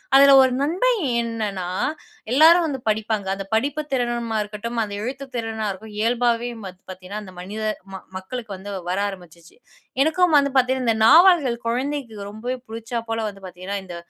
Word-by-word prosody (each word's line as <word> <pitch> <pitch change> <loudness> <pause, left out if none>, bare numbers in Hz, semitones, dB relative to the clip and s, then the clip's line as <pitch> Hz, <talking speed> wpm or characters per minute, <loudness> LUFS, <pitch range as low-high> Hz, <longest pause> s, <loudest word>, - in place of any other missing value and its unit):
அதில 275 0 +8
ஒரு 260 - +4
நன்மை 350 - +2 0.3
என்னன்னா, 215 -5 -3 0.7
எல்லாரும் 330 +5 +6
வந்து 275 -4 -3
படிப்பாங்க. 215 -2 -1
அந்த 195 - -6
படிப்பு 280 +7 +1
திறனா 240 -2 -1
இருக்கட்டும், 210 +3 -5
அந்த 205 -1 -6
எழுத்து 265 +3 -5
திறனாக 225 -2 -2
இருக்கட்டும், 210 +2 -10
இயல்பாகவே 240 +1 +1 0.2
பாத் 185 -1 -9
பார்த்தீங்கன்னா 185 +3 -7
அந்த 185 - -11
மனித 205 +4 -6 0.5
மக்களுக்கு 220 +4 -7
வந்து 190 +2 -9 0.2
வர 185 - 0
ஆரம்பிச்சிச்சு.எனக்கும் 245 - -2
வந்து 280 0 +3
பார்த்தீங்கன்னா 260 0 +2
இந்த 225 - +2
நாவல்கள் 320 -4 +6
குழந்தைக்கு 255 -1 -2
ரொம்பவே 240 +5 -4
பிடிச்சா 230 +1 -4
போல, 225 0 -1
வந்து 195 -1 -13
பார்த்தீங்கன்னா 185 +3 -5
இந்த 175 - -8
230 Hz, 150 wpm, -22 LUFS, 205-265 Hz, 0.7 s, அதில